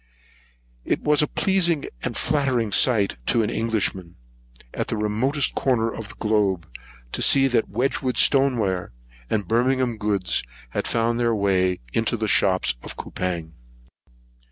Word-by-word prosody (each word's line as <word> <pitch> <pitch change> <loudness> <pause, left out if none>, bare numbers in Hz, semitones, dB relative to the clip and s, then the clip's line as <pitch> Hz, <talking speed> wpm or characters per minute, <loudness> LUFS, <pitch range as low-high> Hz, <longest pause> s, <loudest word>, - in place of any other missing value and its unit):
It - - -1
was 150 -1 +3
a 150 - +2
pleasing 175 -6 +1 0.2
and - - -3
flattering 130 -7 0
sight 100 - +3
to 115 - +3
an 105 - -2
Englishman, 100 -6 -2 0.6
at - - -3
this 110 - -2
remotest 125 +7 0
corner 115 -4 0
of 110 - -7
the - - -10
globe, 100 -5 0 0.4
to - - -3
see 135 0 +5
that 120 -3 +1
Wedgewood's 125 +2 -1
stoneware, 110 - +2 0.4
and 105 -4 -1
Birmingham 125 +1 +1
goods, 100 -5 0 0.3
had - - -2
found 115 +1 0
their 115 -1 +1
way 95 - +1
into 115 +1 0
the 110 0 -2
shops 95 -2 +2
of - - -8
Coupang. 85 -3 -4
115 Hz, 140 wpm, -23 LUFS, 100-130 Hz, 0.6 s, see